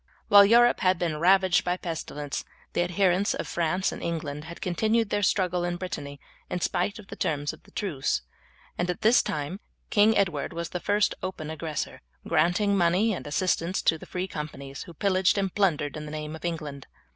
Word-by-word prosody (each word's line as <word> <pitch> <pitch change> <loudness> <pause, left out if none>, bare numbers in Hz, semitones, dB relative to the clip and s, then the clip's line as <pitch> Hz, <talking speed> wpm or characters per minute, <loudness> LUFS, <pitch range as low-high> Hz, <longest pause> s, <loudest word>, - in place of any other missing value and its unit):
While 200 0 +9
Europe 240 +3 +5
had 185 -1 +3
been 165 -3 -2
ravaged 190 +1 +4
by 180 0 0
pestilence 150 -4 -5 0.3
the - - +1
adherents 180 +2 +2
of - - -4
France 175 +3 0
and - - -7
England 155 -3 -4
had 170 +1 -9
continued 220 +4 +1
their 205 - +1
struggle 180 -2 +1
in 175 0 -1
Brittany 145 -6 -6 0.3
in 180 - -2
spite 180 +4 -1
of 215 - -11
the - - -7
terms 145 -1 -1
of - - -14
the - - -21
truce, 135 - -2 0.6
and 175 - +1
this 215 +7 +4
time 150 +6 -4 0.3
King 215 +1 +5
Edward 175 -4 0
was 170 0 -4
the 180 - -4
first 205 +3 +2
open 165 -4 -5
aggressor, 160 -2 -4 0.3
granting 175 +5 +2
money 190 +5 +3
and 180 - -6
assistance 175 +3 0
to 160 - +3
the - - -11
free 185 +1 -3
companies, 140 -4 -7
who 170 - -12
pillaged 190 +2 +2
and 195 -2 0
plundered 160 -8 +1
in 155 0 -6
the 150 - -7
name 155 0 -5
of 160 - -12
England. 150 -5 -4
175 Hz, 190 wpm, -27 LUFS, 155-195 Hz, 0.6 s, While